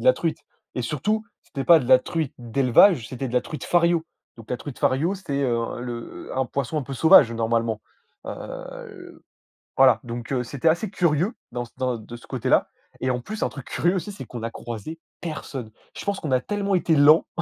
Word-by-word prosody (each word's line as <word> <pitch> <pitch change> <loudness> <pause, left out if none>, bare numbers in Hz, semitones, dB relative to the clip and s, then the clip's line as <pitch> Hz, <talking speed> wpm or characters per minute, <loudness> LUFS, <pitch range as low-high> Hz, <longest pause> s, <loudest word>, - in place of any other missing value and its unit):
de - - -6
la - - +9
truite. - - -2 0.4
Et - - -1
surtout, 215 +1 -1 0.2
c'était 135 -1 -5
pas 170 -2 +7
de 125 - -5
la 130 -1 +8
truite 160 +1 -3
d'élevage, 125 - +4
c'était 130 +1 -4
de 120 - -7
la 125 - +3
truite 155 - -7
Fario. 170 -1 +3 0.3
Donc 115 -2 -13
la 125 - 0
truite 140 +1 -8
Fario, 160 +9 +1
c'était, 145 -7 -3
heu, 120 -2 -1
le 120 -1 -7
un 130 0 +1
poisson 140 +4 -2
un - - -2
peu 135 - -6
sauvage 145 -3 +7
normalement, 115 -1 0 0.4
heu, - - -6 0.5
le - - -13 0.5
voilà. 130 -4 +6
Donc 120 +1 -6
heu, 130 - +1
c'était 140 +6 -2
assez 170 +6 +2
curieux 175 +1 +1 0.2
dans 120 0 -3
dans 125 -2 -1
de 115 +2 -10
ce 120 - -13
côté-là - - +1 0.3
et 130 - 0
en 125 - -1
plus 215 - -4
un - - +1
truc 140 -4 -9
curieux 175 +3 +1
aussi, 195 +3 -3
c'est 195 -9 -8
qu'on 120 0 -8
a 115 - -2
croisé 120 +7 -7 0.2
personne. 140 -7 -5 0.3
Je - - -6
pense 200 -1 -1
qu'on 150 - -4
a 130 - +4
tellement 200 +4 -2
été 170 -3 +3
lents 150 +3 +6
135 Hz, 210 wpm, -24 LUFS, 120-170 Hz, 0.5 s, la